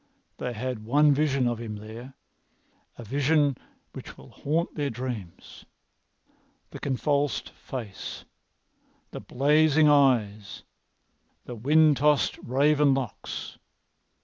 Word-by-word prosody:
They 125 - -3
had 120 -1 -4
one 145 +6 +4
vision 140 -3 +1
of 120 -1 -2
him 110 -2 -6
there—a 115 +2 -14
vision 145 +4 +1 0.4
which - - -10
will - - -15
haunt 160 +4 -2
their 145 -2 -2
dreams—the 115 -8 -7 1.1
convulsed 140 +1 -1
face, 115 -7 -8 0.9
the - - -7
blazing 150 +3 +3
eyes, 110 -8 +2 0.8
the 125 - -7
wind 150 +5 +3
tossed 150 0 +2
raven 140 +2 +2
locks. 130 -5 -6
135 Hz, 95 wpm, -26 LUFS, 120-145 Hz, 1.1 s, one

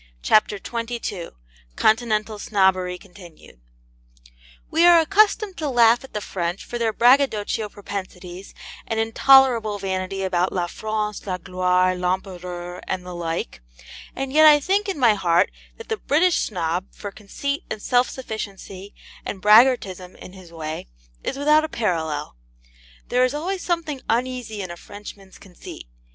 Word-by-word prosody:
CHAPTER 215 -1 +3
XXII 230 -5 -5 0.5
CONTINENTAL 215 -1 +1
SNOBBERY 190 -3 +1
CONTINUED 175 - -16 1.1
We 330 - +3
are 345 -1 +8
accustomed 400 +3 +2
to 305 -2 -2
laugh 235 -1 +4
at 265 - -14
the 210 - -3
French 175 -1 -4
for 240 - -5
their 230 -1 +1
braggadocio 230 -4 +2
propensities, 190 -2 -8 0.3
and 225 - -2
intolerable 230 -1 +4
vanity 190 0 -3
about 180 -1 0
La 180 -2 -1
France, 210 +2 -4
la 185 -1 -2
gloire, 185 0 +1
l'Empereur, 180 -1 -4
and 185 -1 -3
the 180 - -7
like; 165 - -4 0.5
and 270 0 -4
yet 310 +1 +7
I 295 -1 +7
think 395 +7 0
in 385 - -3
my 240 -5 +5
heart 175 -4 +2 0.3
that 460 - -12
the 445 - -1
British 345 +1 +2
Snob, 175 -1 -2
for 205 - -8
conceit 280 +8 -4
and 215 - -4
self 245 +4 +2
sufficiency 200 -5 -8 0.3
and 195 - -5
braggartism 210 -4 +4
in 180 - -12
his 185 -3 -14
way, 160 - -6 0.4
is - - -3
without 300 +2 +4
a 315 - -3
parallel. 160 - -2 0.7
There 250 +1 +3
is 255 +3 +1
always 365 +5 -3
something 320 -6 -2
uneasy 240 -3 -2
in 185 - -7
a 175 - -8
Frenchman's 200 0 -12
conceit. 180 -3 -12
210 Hz, 145 wpm, -22 LUFS, 185-255 Hz, 1.1 s, are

